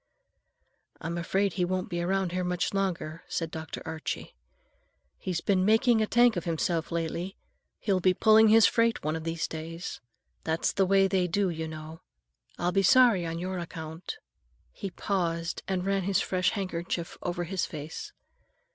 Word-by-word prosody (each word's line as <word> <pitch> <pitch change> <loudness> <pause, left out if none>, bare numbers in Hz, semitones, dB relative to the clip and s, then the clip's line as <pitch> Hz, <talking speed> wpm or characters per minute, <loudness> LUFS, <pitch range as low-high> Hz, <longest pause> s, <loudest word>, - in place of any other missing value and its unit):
"I'm 170 +1 -4
afraid 190 +3 0
he 180 - 0
won't 185 +1 -1
be 175 -2 -3
around 190 0 0
here 180 +1 -1
much 180 +1 -1
longer," 180 -5 -2
said 165 -1 -3
Dr. 160 0 -6
Archie. 160 -1 -5 0.9
"He's 180 -3 -2
been 190 -2 +2
making 225 +3 +4
a 215 - +1
tank 240 0 +5
of 175 - -3
himself 170 0 -1
lately. 170 +3 -3 0.4
He'll 195 -3 +1
be 185 0 +3
pulling 220 +2 +6
his 220 0 +7
freight 230 0 +2
one 155 +1 0
of 160 0 -5
these 165 -1 -1
days. 165 +2 -6 0.4
That's 160 0 0
the 195 -2 +2
way 195 0 +5
they 190 -2 +1
do, 190 +1 +1
you 160 -1 -4
know. 155 +1 -8 0.6
I'll 175 +1 0
be 195 +2 +3
sorry 220 -4 +5
on 165 0 -3
your 185 +1 -3
account." 165 0 -6 0.5
He 195 - -5
paused 170 -3 -2
and 185 -1 -1
ran 195 0 +1
his 190 0 +1
fresh 185 -1 +1
handkerchief 175 -4 -3
over 175 0 -2
his 185 +1 -2
face. 155 0 -7
180 Hz, 165 wpm, -28 LUFS, 165-195 Hz, 0.9 s, his